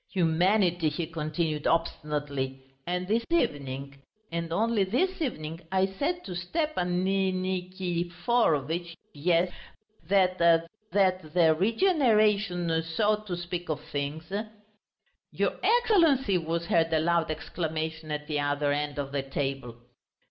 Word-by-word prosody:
"Humanity!" 175 Hz, -1 st, +2 dB
he 155 Hz, +3 st, -3 dB
continued 155 Hz, -1 st, -2 dB
obstinately; 145 Hz, -5 st, -1 dB, 0.2 s
"and 180 Hz, +1 st, -2 dB
this 225 Hz, +3 st, +1 dB
evening... 140 Hz, -, -1 dB, 0.3 s
and 170 Hz, 0 st, -3 dB
only 215 Hz, +3 st, +2 dB
this 335 Hz, -, 0 dB
evening 165 Hz, -, -3 dB
I 190 Hz, 0 st, +3 dB
said 290 Hz, -, -2 dB
to 185 Hz, -, -5 dB
Stepan 180 Hz, -, -1 dB
Niki 185 Hz, -1 st, 0 dB
ki 175 Hz, -2 st, -1 dB
foro 175 Hz, -, +2 dB
vitch... 170 Hz, +4 st, -4 dB, 0.2 s
yes... 170 Hz, +4 st, +2 dB, 0.6 s
that... 185 Hz, -1 st, +3 dB
that 180 Hz, 0 st, +1 dB
the 165 Hz, -3 st, +6 dB
regeneration, 210 Hz, -, +2 dB
so 210 Hz, +6 st, +1 dB
to 205 Hz, -4 st, -5 dB
speak, 175 Hz, 0 st, -5 dB
of 155 Hz, -1 st, -1 dB
things...." 155 Hz, +3 st, -5 dB, 1.0 s
"Your -, -, -1 dB
Excellency!" 330 Hz, -, +4 dB
was 165 Hz, +1 st, -2 dB
heard 165 Hz, -1 st, +2 dB
a 160 Hz, -, +3 dB
loud 170 Hz, 0 st, +1 dB
exclamation 160 Hz, 0 st, -4 dB
at 150 Hz, 0 st, -3 dB
the 150 Hz, -1 st, -1 dB
other 145 Hz, 0 st, 0 dB
end 145 Hz, 0 st, -2 dB
of 140 Hz, -1 st, -3 dB
the 140 Hz, -1 st, -1 dB
table. 135 Hz, -3 st, -3 dB
170 Hz, 125 wpm, -28 LUFS, 155-195 Hz, 1.0 s, the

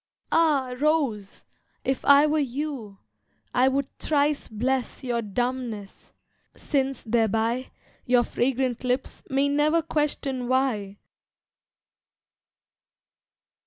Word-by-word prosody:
ah! 290 Hz, -6 st, +3 dB
rose, 275 Hz, -10 st, 0 dB, 0.4 s
if 265 Hz, 0 st, -1 dB
I 285 Hz, +1 st, +7 dB
were 305 Hz, +1 st, +2 dB
you, 265 Hz, -6 st, -4 dB, 0.6 s
I 255 Hz, +1 st, +4 dB
would 275 Hz, +1 st, +1 dB
thrice 295 Hz, -1 st, +1 dB
bless 250 Hz, +5 st, -2 dB
your 240 Hz, -2 st, -1 dB
dumbness, 230 Hz, -1 st, -4 dB, 0.5 s
since 270 Hz, -2 st, -1 dB
thereby 225 Hz, +2 st, 0 dB, 0.4 s
Your 245 Hz, -1 st, +4 dB
fragrant 255 Hz, 0 st, -1 dB
lips 255 Hz, +1 st, -2 dB
may 275 Hz, +1 st, +2 dB
never 300 Hz, +3 st, +2 dB
question 285 Hz, -5 st, -1 dB
why. 235 Hz, -7 st, 0 dB
260 Hz, 90 wpm, -25 LUFS, 235-285 Hz, 0.6 s, I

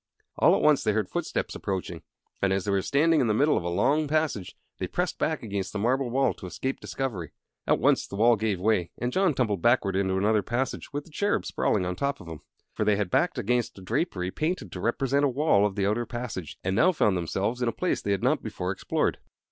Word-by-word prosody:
All -, -, +6 dB
at -, -, -1 dB
once 150 Hz, -2 st, +4 dB
they 105 Hz, -, +2 dB
heard 105 Hz, -3 st, -1 dB
footsteps -, -, -2 dB
approaching; 90 Hz, -3 st, -4 dB, 0.4 s
and, 100 Hz, -, +2 dB
as 95 Hz, 0 st, 0 dB
they 100 Hz, -, 0 dB
were 100 Hz, -1 st, +2 dB
standing 150 Hz, -, +3 dB
in 125 Hz, -, +2 dB
the 105 Hz, -, +2 dB
middle 145 Hz, +6 st, +3 dB
of -, -, -1 dB
a 85 Hz, -, -2 dB
long 140 Hz, -, +2 dB
passage, 150 Hz, -, -1 dB, 0.2 s
they -, -, -2 dB
pressed -, -, -2 dB
back -, -, -1 dB
against 100 Hz, -4 st, -4 dB
the -, -, -2 dB
marble 125 Hz, +4 st, +1 dB
wall 135 Hz, +1 st, +2 dB
to 95 Hz, -, -9 dB
escape 130 Hz, +8 st, -3 dB
discovery. 110 Hz, -, -4 dB, 0.3 s
At -, -, +4 dB
once -, -, +2 dB
the -, -, -7 dB
wall 115 Hz, +3 st, +5 dB
gave 105 Hz, -3 st, -1 dB
way, 95 Hz, -3 st, +1 dB
and 125 Hz, +1 st, -2 dB
John 190 Hz, -6 st, +2 dB
tumbled 105 Hz, -8 st, 0 dB
backward 115 Hz, -4 st, +3 dB
into 95 Hz, -1 st, +1 dB
another 105 Hz, +2 st, +2 dB
passage, 120 Hz, +5 st, -3 dB
with 145 Hz, +1 st, -3 dB
the 165 Hz, -, -18 dB
Cherub 205 Hz, +7 st, 0 dB
sprawling 95 Hz, -3 st, 0 dB
on 90 Hz, 0 st, -2 dB
top 140 Hz, +6 st, -2 dB
of 90 Hz, -, -12 dB
him. 80 Hz, -2 st, -7 dB, 0.3 s
For -, -, -1 dB
they 105 Hz, -, +3 dB
had 100 Hz, -3 st, -2 dB
backed -, -, +2 dB
against 120 Hz, 0 st, 0 dB
a -, -, -10 dB
drapery 100 Hz, -, -1 dB
painted 165 Hz, -, -2 dB
to 90 Hz, -, -6 dB
represent 135 Hz, +7 st, +1 dB
a 145 Hz, -, +4 dB
wall 125 Hz, -7 st, +3 dB
of 100 Hz, -, -7 dB
the 100 Hz, -2 st, 0 dB
outer 110 Hz, +3 st, 0 dB
passage, 120 Hz, -, -5 dB
and 95 Hz, +1 st, 0 dB
now 185 Hz, -, +5 dB
found 105 Hz, -, +2 dB
themselves 95 Hz, +7 st, -2 dB
in 120 Hz, -, +1 dB
a -, -, +2 dB
place 180 Hz, -, -1 dB
they -, -, -4 dB
had 100 Hz, -2 st, 0 dB
not -, -, +2 dB
before -, -, -3 dB
explored. -, -, -1 dB
110 Hz, 240 wpm, -27 LUFS, 95-135 Hz, 0.4 s, All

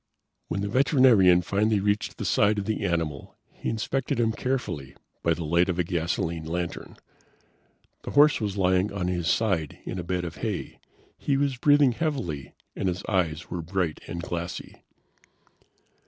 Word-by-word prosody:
When 100 Hz, -, -2 dB
the 100 Hz, -, -1 dB
veterinarian 115 Hz, -, +5 dB
finally 105 Hz, +3 st, +1 dB
reached 105 Hz, +1 st, -1 dB
the -, -, -4 dB
side 105 Hz, +1 st, +3 dB
of 100 Hz, -, -2 dB
the 110 Hz, -, -2 dB
animal, 80 Hz, -5 st, -2 dB, 0.2 s
he -, -, -4 dB
inspected 115 Hz, +3 st, -1 dB
him 115 Hz, -1 st, +3 dB
carefully 110 Hz, -, -3 dB, 0.3 s
by 85 Hz, -1 st, +2 dB
the 85 Hz, -, -5 dB
light 85 Hz, +4 st, +2 dB
of 90 Hz, -, -1 dB
a 90 Hz, -, +2 dB
gasoline 85 Hz, -1 st, -2 dB
lantern. 85 Hz, +1 st, -4 dB, 1.0 s
The -, -, -7 dB
horse 145 Hz, -2 st, +5 dB
was 100 Hz, -2 st, -2 dB
lying 95 Hz, +1 st, +2 dB
on 100 Hz, -3 st, -2 dB
his 85 Hz, -2 st, -1 dB
side 90 Hz, -10 st, +1 dB
in 90 Hz, -, -4 dB
a -, -, -3 dB
bed 90 Hz, 0 st, -2 dB
of 85 Hz, -1 st, -7 dB
hay; -, -, -4 dB, 0.4 s
he 140 Hz, -, +1 dB
was 140 Hz, -1 st, +1 dB
breathing 145 Hz, 0 st, +5 dB
heavily 115 Hz, -, -3 dB, 0.2 s
and 95 Hz, -, -2 dB
his 90 Hz, -1 st, -2 dB
eyes 85 Hz, -5 st, -1 dB
were 90 Hz, -, -3 dB
bright 85 Hz, -1 st, -2 dB
and 85 Hz, 0 st, -5 dB
glassy. 85 Hz, 0 st, -5 dB
95 Hz, 165 wpm, -26 LUFS, 85-110 Hz, 1.0 s, veterinarian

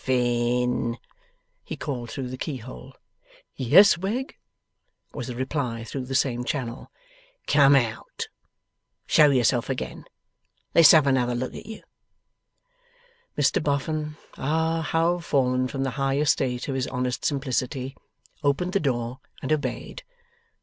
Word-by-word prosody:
'Bof -, -, -22 dB
fin!' 125 Hz, -1 st, +1 dB, 0.7 s
he -, -, -7 dB
called 125 Hz, -6 st, -4 dB
through 130 Hz, 0 st, -5 dB
the 130 Hz, -, -5 dB
keyhole. 130 Hz, -1 st, -7 dB, 0.6 s
'Yes, 170 Hz, -, +6 dB
Wegg,' 225 Hz, +9 st, -3 dB, 0.8 s
was -, -, -5 dB
the 125 Hz, -, -5 dB
reply 130 Hz, -3 st, -2 dB
through 130 Hz, +3 st, -5 dB
the 135 Hz, +1 st, -4 dB
same 125 Hz, -3 st, +1 dB
channel. 125 Hz, -2 st, -4 dB, 0.6 s
'Come 140 Hz, -1 st, +5 dB
out. 115 Hz, -5 st, -1 dB, 0.8 s
Show 150 Hz, -1 st, +6 dB
yourself 125 Hz, -2 st, +2 dB
again. 135 Hz, -, -4 dB, 0.7 s
Let's 165 Hz, -2 st, +8 dB
have 155 Hz, -3 st, +6 dB
another 125 Hz, -3 st, +2 dB
look 130 Hz, +1 st, -3 dB
at -, -, -9 dB
you!' 220 Hz, -1 st, -9 dB, 1.5 s
Mr 135 Hz, -3 st, +2 dB
Boffin 150 Hz, +1 st, -2 dB, 0.2 s
ah, 160 Hz, +3 st, 0 dB
how 165 Hz, +3 st, +1 dB
fallen 130 Hz, -6 st, +1 dB
from 135 Hz, +1 st, -3 dB
the 135 Hz, -, -1 dB
high 135 Hz, 0 st, +1 dB
estate 130 Hz, -4 st, +1 dB
of 140 Hz, -, -2 dB
his 130 Hz, -1 st, -1 dB
honest 125 Hz, -1 st, -2 dB
simplicity! 130 Hz, -1 st, -2 dB, 0.5 s
opened 155 Hz, +5 st, 0 dB
the 200 Hz, -, +3 dB
door 125 Hz, -4 st, -2 dB, 0.2 s
and 135 Hz, -, +1 dB
obeyed. 155 Hz, -, -3 dB
135 Hz, 130 wpm, -25 LUFS, 125-150 Hz, 1.5 s, Let's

